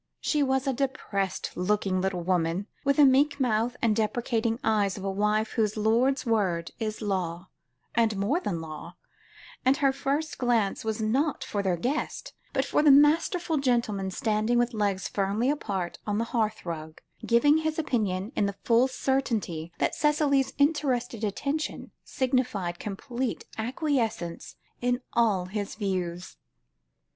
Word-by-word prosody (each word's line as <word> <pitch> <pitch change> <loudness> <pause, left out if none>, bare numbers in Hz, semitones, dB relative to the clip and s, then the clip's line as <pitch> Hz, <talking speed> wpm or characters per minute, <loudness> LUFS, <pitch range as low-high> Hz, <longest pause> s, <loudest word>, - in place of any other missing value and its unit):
She 300 - 0
was 265 -1 +1
a 270 - +1
depressed 235 -8 -2
looking 185 0 0
little 185 -2 -1
woman, 175 +1 0 0.2
with 280 0 +2
the 295 - +8
meek 285 +2 +4
mouth 240 -1 +1
and 220 -2 +3
deprecating 225 +1 0
eyes 210 -3 +1
of 195 - -7
a 195 - -1
wife 210 +2 +1
whose 215 -2 0
lord's 235 +6 +2
word 190 -8 0
is 215 -1 -3
law 185 -3 -2 0.4
and 225 -3 +2
more 220 - +1
than 175 - -3
law 160 +2 -8 0.7
and 265 +2 +4
her 275 -2 +3
first 280 +3 -2
glance 235 -5 +1
was 220 0 -2
not 270 +7 0
for 205 - -2
their 185 -3 0
guest, 295 - -3 0.2
but 270 -1 0
for - - +2
the 300 - +5
masterful 315 +4 +4
gentleman 235 -8 0
standing 215 +2 0
with 240 0 +1
legs 200 -3 0
firmly 205 +6 0
apart 195 -11 -3
on 205 0 0
the 225 - +1
hearth 220 -4 0
rug, 160 -2 -6 0.2
giving 290 +6 +4
his 315 0 -1
opinion, 210 - -1
in 205 - +2
the 200 -1 -5
full 235 +2 +4
certainty 225 -12 -1
that - - 0
Cicely's 295 -3 +2
interested 280 -6 +1
attention, 280 +9 -2
signified 245 -9 -1
complete 240 +4 -4
acquiescence 225 - -2 0.3
in 245 +1 0
all 210 -6 +2
his 200 +2 -4
views. 185 -4 -3
225 Hz, 150 wpm, -27 LUFS, 195-265 Hz, 0.7 s, the